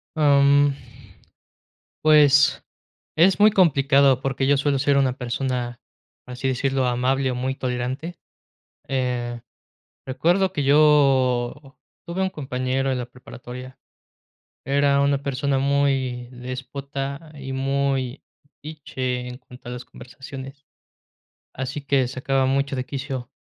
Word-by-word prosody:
Am, 140 -1 +4 1.3
pues, 145 -2 +5 0.5
es 185 +5 +4
muy 215 - +7
complicado 140 - +4
porque 135 0 -1
yo 140 +1 +4
suelo 140 0 +1
ser 140 +1 +2
una 130 -2 +2
persona, 125 -1 -3 0.4
por 125 - -9
así 125 +2 -2
decirlo, 130 0 0
amable 130 +2 +1
o - - -2
muy 130 +2 -2
tolerante. 130 +7 -4 0.7
Eh, 125 -2 -2 0.7
recuerdo 175 +9 +1
que 145 -6 -2
yo 135 -2 +3 0.3
tuve 175 +2 -4
un 190 - +1
compañero 135 -3 -2
en 130 - -1
la 125 - -4
preparatoria, 125 +1 -11 0.9
era 140 0 +3
una 140 0 +1
persona 140 0 -1
muy 135 -3 0
déspota, 135 +4 -6
y 135 -2 -7
muy 135 -1 -1 0.2
metiche 130 -4 -5
en 125 - -8
cuanto 125 -1 -13
a - - -6
las 125 0 -7
conversaciones, 135 +2 -11 0.9
así 135 +2 -5
que 140 -2 +1
sacaba 130 +1 0
mucho 140 +1 0
de 130 0 -3
quicio, 130 -3 -5
135 Hz, 120 wpm, -23 LUFS, 125-140 Hz, 1.3 s, muy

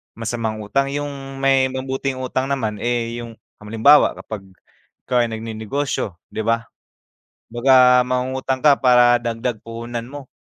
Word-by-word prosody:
masamang 115 -1 -3
utang. 135 +7 0
Yung 140 -2 -6
may 135 -1 +4
mabuting 130 +1 -3
utang 130 +1 -2
naman, 115 -7 -2
eh, 120 0 -2
yung, 115 -1 -8 0.2
halimbawa 115 +8 +4
kapag 100 -3 -8 0.6
ikaw 125 -1 +2
ay - - -3
nagnenegosyo, 110 0 -3 0.2
'di 110 - -4
ba? 115 0 0 0.8
Baka 125 +1 +5
mangungutang 130 +1 -2
ka 145 -2 +5
para 125 -1 +5
dagdag 120 0 -3
puhunan 115 +1 -6
mo, 135 +1 -10
125 Hz, 130 wpm, -20 LUFS, 115-135 Hz, 0.8 s, Baka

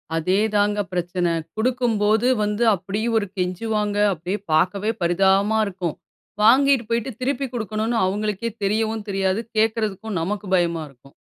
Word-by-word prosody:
அதே 185 +4 +1 0.2
தாங்க 205 0 +2
பிரச்சன. 175 0 -1 0.3
குடுக்கும்போது 225 -2 +1 0.2
வந்து 210 +2 0
அப்படி 195 +4 -4 0.2
ஒரு 205 -2 0
கெஞ்சுவாங்க. 205 +3 -1 0.2
அப்படியே 180 +4 -4 0.2
பார்க்கவே 200 +6 +2
பரிதாபமா 195 +5 +3
இருக்கும். 180 -4 -4 0.5
வாங்கிட்டு 260 +2 +5
போய்விட்டு 235 +2 -1
திருப்பி 275 +1 -1
குடுக்கனும்னு 220 0 -2
அவங்களுக்கே 210 +3 -2
தெரியவும் 220 +1 0
தெரியாது. 195 +1 0 0.2
கேட்குறதுக்கும் 220 -2 0
நமக்கு 205 +4 -3
பயமா 170 -2 0
இருக்கும். 135 +1 -21
210 Hz, 120 wpm, -22 LUFS, 185-220 Hz, 0.5 s, வாங்கிட்டு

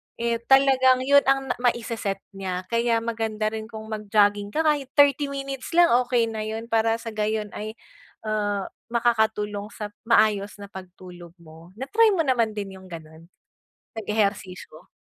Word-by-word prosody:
eh 235 0 -1
talagang 260 -1 +5
yun 280 +1 +5
ang 270 -1 +2
na - - -1
maise-set 230 -5 -1
niya. 185 -2 -4
Kaya 230 -1 +1
maganda 220 -2 -2
rin 220 0 -6
kung 220 -1 -9
mag 215 -1 -5
jogging 205 -1 +3
ka, 320 - +2
kahit 295 -3 +1
30 285 0 +4
minutes 275 +2 -6
lang 345 0 +6
okey 235 -2 +1
na 220 -1 -4
yun. 220 +1 -5
Para 225 0 +2
sa 230 0 -7
gayon 215 0 -2
ay, 215 +1 -6 0.5
ah, 205 -2 -1 0.2
makakatulong 220 -3 0
sa 210 +1 -6 0.2
maayos 215 -3 +2
na 200 - -8
pagtulog 180 -2 -12
mo. 165 +1 -15
Na-try 430 - +3
mo 330 -6 0
naman 235 -4 +2
din 200 -2 -6
yung 190 -1 -14
ganun, 160 +1 -11 0.7
nag-ehersisyo? 200 -6 -3
220 Hz, 155 wpm, -24 LUFS, 200-245 Hz, 0.7 s, lang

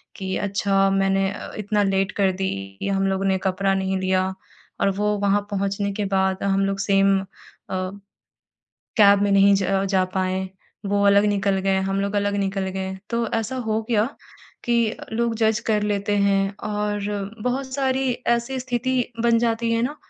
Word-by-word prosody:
कि 190 -1 -4
अच्छा, 195 -1 +1
मैंने 195 0 +2
अ, - - -8
इतना 210 0 0
लेट 195 0 +1
कर 190 -1 +4
दी 190 +1 -2 0.3
कि - - -3
हम 195 0 +1
लोगों 195 0 -1
ने 190 -1 +2
कपड़ा 195 +1 +1
नहीं 190 0 -1
लिया 185 0 0 0.5
,और - - +4
वो 200 +2 -1
वहाँ 200 0 +2
पहुँचने 200 0 -1
के 205 +1 -2
बाद 190 0 +1
हम 195 0 +1
लोग 195 0 -1
सेम 195 -1 +3
अ, - - -8 1.7
कैब 200 -2 +6
में 205 - +2
नहीं 200 0 +6
ज 195 - -1 0.3
जा 190 -1 +3
पाए, 190 0 -1 0.4
वो 200 0 +1
अलग 200 +1 +5
निकल 200 -1 +1
गए, 195 0 +1
हम 195 +1 -1
लोग 200 +1 -2
अलग 205 0 0
निकल 195 -1 -1
गए। 190 0 -4
तो 235 0 0
ऐसा 225 +3 -2
हो 220 0 +1
गया 220 0 +2 0.6
कि 235 -2 +2
अ, - - -9
लोग 235 0 0
जज 220 -1 +2
कर 210 -1 +2
लेते 205 0 0
हैं, 200 0 +2
और 205 -1 -2
बहुत 260 +2 -2
सारी 265 -1 +1 0.2
ऐसी 235 +3 0
स्थिति 250 0 0 0.2
बन 235 -1 +4
जाती 230 0 0
है 230 0 +1
ना 280 +5 -2
200 Hz, 180 wpm, -23 LUFS, 195-220 Hz, 1.7 s, कैब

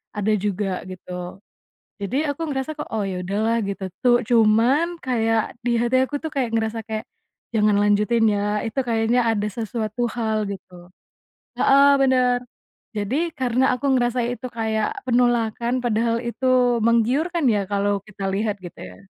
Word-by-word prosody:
ada 210 +1 0
juga 195 -1 -2
gitu, 180 0 -8 0.6
jadi 200 +6 -3 0.2
aku 285 - -16
ngerasa 270 +1 -2
kok 300 - -6
oh 220 -2 -1
ya 185 -1 -4
udahlah 215 +5 0
gitu 195 -1 -4 0.2
tuh 245 -1 +6
cuman 240 +9 +3
kayak 225 -3 0
di 240 -1 +1
hati 240 +2 +2
aku 290 - -3
tuh 320 - -1
kayak 255 -5 -1
ngerasa 225 0 -1
kayak, 220 0 -3 0.5
jangan 210 -1 +3
lanjutin 210 +3 +2
ya 205 +1 0
itu 225 +4 -2
kayaknya 230 +1 +2
ada 210 -2 -1
sesuatu 220 +2 -3
hal 220 -2 0
gitu, 190 -1 -11 0.9
heeh, 275 +1 +6
bener 255 -2 +3 0.6
jadi 210 +5 -2 0.2
karena 255 0 +1
aku 250 - -6
ngerasa 245 0 +1
itu 250 +1 -5
kayak 220 -1 -2
penolakan 240 0 +1
padahal 230 0 +1
itu 240 +2 -3 0.4
menggiurkan 265 +9 +2
ya 205 -2 +1
kalau 200 0 +1
kita 200 -2 -6
lihat 205 0 -1
gitu 175 - -10
ya. 90 0 -11
225 Hz, 150 wpm, -22 LUFS, 210-245 Hz, 0.9 s, tuh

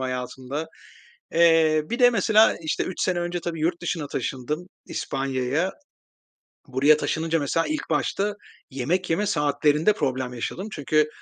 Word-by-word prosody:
hayatımda. 130 +3 -4 0.7
Eee, 165 -2 +5
bir 235 - -1
de, 245 -1 +7
mesela, 220 0 +4
işte, 155 - -1
3 185 - -5
sene 180 -1 +1
önce, 175 0 -2
tabii, 165 -1 -4
yurt 170 +2 0
dışına 165 -3 -2
taşındım, 150 +7 -4 0.2
İspanya'ya. 135 +5 -1 1.0
Buraya 135 +4 +4
taşınınca, 165 +2 -1
mesela, 165 +4 0
ilk 310 - -3
başta 195 +7 0 0.4
yemek 160 +8 -1
yeme 200 +6 +1
saatlerinde 150 +3 +2
problem 130 - -2
yaşadım 180 - -4
çünkü 155 +1 +1
155 Hz, 135 wpm, -24 LUFS, 135-175 Hz, 1.0 s, de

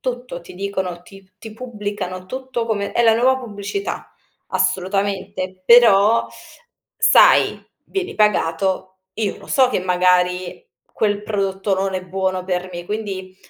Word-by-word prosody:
tutto, 245 -7 -5
ti 170 - -13
dicono 190 -2 -4
ti 195 +1 -16
ti 220 -1 -10
pubblicano 205 -6 -6
tutto 260 0 -4
come 205 -3 -2
è 235 - +2
la 225 -1 +5
nuova 260 +3 +3
pubblicità, 220 - -5 0.4
assolutamente. 190 0 -2
Però, 230 -1 +6 0.7
sai, - - +5 0.2
vieni 390 -1 -4
pagato, 190 -2 0 0.2
io 210 -2 -2
lo - - -14
so 260 -2 +3
che, 250 - 0
magari, 180 - +1 0.3
quel 205 -1 0
prodotto 195 -1 -1
non 190 0 -2
è 185 - -2
buono 185 0 -2
per 180 0 -2
me. 175 0 -6
Quindi, 195 -3 -5
195 Hz, 135 wpm, -20 LUFS, 185-220 Hz, 0.7 s, Però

